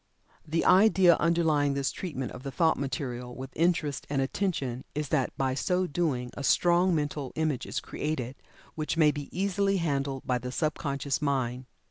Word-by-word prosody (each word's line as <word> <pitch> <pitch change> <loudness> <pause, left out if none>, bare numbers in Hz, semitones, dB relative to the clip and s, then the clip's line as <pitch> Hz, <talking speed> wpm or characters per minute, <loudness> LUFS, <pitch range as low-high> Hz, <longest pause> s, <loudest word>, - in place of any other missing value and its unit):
The 165 +2 0
idea 190 -2 +6
underlying 160 -4 +2
this 140 -1 0
treatment 140 -8 -5
of 125 - -9
the 135 - -5
thought 160 +4 +2
material 125 -3 -4
with 130 0 -7
interest 165 -4 0
and 140 -1 0
attention 135 -4 -1
is 150 -2 -2
that 135 -5 +1
by 135 -1 +1
so 180 +7 0
doing 140 -7 -1
a 140 - -6
strong 175 +5 +3
"Mental 145 -3 -2
Image" 155 -5 -1
is - - -2
created, 135 -4 -4 0.4
which 155 +1 -3
may 155 -2 +5
be 145 -1 -6
easily 195 +1 +1
handled 140 -5 -1
by 125 -1 +1
the 125 +1 -5
sub 155 +3 0
conscious 140 0 -2
mind. 130 -3 -1
145 Hz, 170 wpm, -28 LUFS, 135-170 Hz, 0.4 s, idea